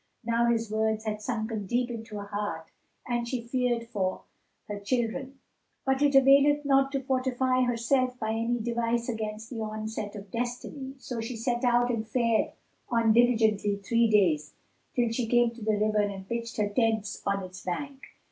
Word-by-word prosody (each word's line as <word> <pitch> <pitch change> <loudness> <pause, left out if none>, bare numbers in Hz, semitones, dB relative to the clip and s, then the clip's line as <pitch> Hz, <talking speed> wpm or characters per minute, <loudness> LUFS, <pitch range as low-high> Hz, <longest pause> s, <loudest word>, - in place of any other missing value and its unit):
Now 235 +1 +2
his 230 -2 +1
words 220 0 0
had 210 -1 -2
sunken 220 -3 -3
deep 245 +3 0
into 225 -2 -7
her 200 - -5
heart 200 -6 -4 0.3
and 240 -1 -1
she 255 +1 -2
feared 245 -2 0
for 190 -5 -2 0.4
her 205 -1 -4
children; 250 +5 -2 0.5
but 265 +1 +1
it 285 -1 +3
availeth 280 +2 +6
not 270 -1 +3
to 275 -1 -1
fortify 255 -1 +1
herself 250 +1 +1
by 220 -2 -2
any 230 +2 0
device 235 0 -1
against 220 -1 -4
the 230 -3 -4
onset 215 -1 -4
of 200 -2 -9
Destiny. 250 +3 -4
So 245 -3 -5
she 230 +2 -4
set 240 +2 -1
out 245 0 +3
and 225 -2 -2
fared 230 -1 +1 0.4
on 230 -2 +3
diligently 220 -4 +3
three 230 +3 +2
days, 165 -8 +2 0.4
till 240 -2 +2
she 230 0 -1
came 240 0 +4
to 235 0 -13
the 215 -1 +1
river 215 0 +2
and 195 -2 -3
pitched 235 +1 -4
her 210 -1 +1
tents 220 -1 0
on 200 -1 0
its 185 0 -9
bank. 275 +9 -4
230 Hz, 175 wpm, -28 LUFS, 215-245 Hz, 0.5 s, availeth